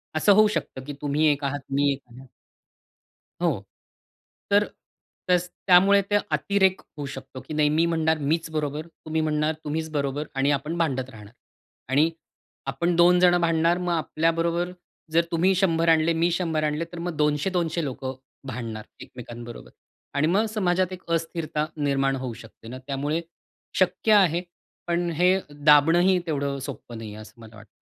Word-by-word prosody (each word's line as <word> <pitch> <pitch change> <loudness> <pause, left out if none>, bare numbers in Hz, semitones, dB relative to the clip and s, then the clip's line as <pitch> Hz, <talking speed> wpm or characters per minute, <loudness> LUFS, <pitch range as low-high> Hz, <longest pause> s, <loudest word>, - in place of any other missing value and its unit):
असं 180 +6 +5
होऊ 215 +2 +6
शकतं 170 -10 -4
की 145 - -6
तुम्ही 150 +2 +2
एक 145 0 -3
आहात 140 +1 -1 0.2
मी 140 0 +3
एक 135 - -8
आहे 130 +3 -13 1.2
हो. - - +4 1.0
तर 205 +1 +5 0.7
तस 180 0 +3 0.2
त्यामुळे 195 +2 +6
ते 205 - +4 0.2
अतिरेक 190 -2 +2 0.2
होऊ 145 -1 -5
शकतो 130 0 -9
की 155 - -4
नाही 150 -1 +3
मी 155 +3 +2
म्हणणार 160 -1 +1
मीच 165 0 0
बरोबर, 155 0 -3
तुम्ही 160 -1 -4
म्हणणार 155 0 0
तुम्हीच 160 +2 -2
बरोबर 145 0 -2
आणि 135 +1 +2
आपण 145 +4 -1
भांडत 130 -6 -1
राहणार. 105 -3 -13 0.6
आणि 145 +5 +3 0.6
आपण 175 0 0
2 175 +1 +6
जण 175 -1 +5
भांडणार 165 +1 +2
मग 180 -1 -1
आपल्याबरोबर 165 +2 0 0.4
जर 170 +1 +4
तुम्ही 180 +3 +3
100 170 -3 +2
आणले, 165 0 +4
मी 165 +1 +1
100 165 -3 -1
आणले, 150 +2 -1
तर 175 - -7
मग 170 -1 -4
200-200 160 +3 0
लोकं 130 -1 -4 0.3
भांडणार 115 -4 -5 0.2
एकमेकांबरोबर 120 0 -10 0.4
आणि 145 +2 +2
मग 195 +7 +2
समाजात 185 -3 +1
एक 185 0 -8
अस्थिरता 165 -2 -1
निर्माण 135 -2 +1
होऊ 130 -2 -4
शकते 115 0 -14
ना; 130 +2 -7
त्यामुळे 145 +3 -1 0.6
शक्य 220 - +2
आहे 180 -5 +4 0.4
पण 175 0 0
हे 180 +4 +4
दाबणंही 150 +6 +4
तेवढं 140 -3 -2
सोपं 120 -2 -8
नाहीये, 110 -2 -8
असं 110 +1 -13
मला 110 -1 -13
वाटतं. 105 0 -14
155 Hz, 155 wpm, -25 LUFS, 140-175 Hz, 1.2 s, होऊ